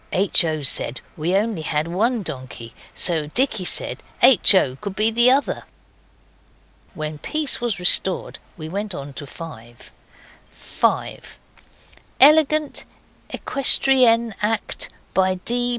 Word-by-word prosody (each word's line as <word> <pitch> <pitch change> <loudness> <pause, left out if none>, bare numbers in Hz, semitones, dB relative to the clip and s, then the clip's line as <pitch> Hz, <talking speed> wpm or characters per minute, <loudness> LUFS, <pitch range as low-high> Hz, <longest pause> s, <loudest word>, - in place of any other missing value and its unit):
(H. 190 -1 +2
O. 155 -2 -4
said 130 -2 0 0.2
we 155 +2 -4
had 195 +3 +1
only 220 -8 -6 0.3
one 230 +2 -1
donkey, 130 -6 -8 0.2
so 160 -4 +2
Dicky 220 - 0
said - - 0 0.2
H. 245 -5 +6
O. 130 -9 +1
could 200 +5 -8
be 215 +2 0
the 240 +2 +4
other. 275 +2 -1 1.3
When 155 -1 -6
peace 305 - -1
was 235 -5 -3
restored 180 +1 +3 0.2
we 155 -2 -8
went 200 +3 -5
on 140 0 -9
to 145 +1 -9
5.) 120 -8 -13 0.6
5. - - -4 0.8
Elegant 305 +1 +3 0.4
equestrian 250 -4 +2
act 210 +1 -2 0.2
by 185 0 +1
D. 245 +6 -2
195 Hz, 120 wpm, -20 LUFS, 155-240 Hz, 1.3 s, H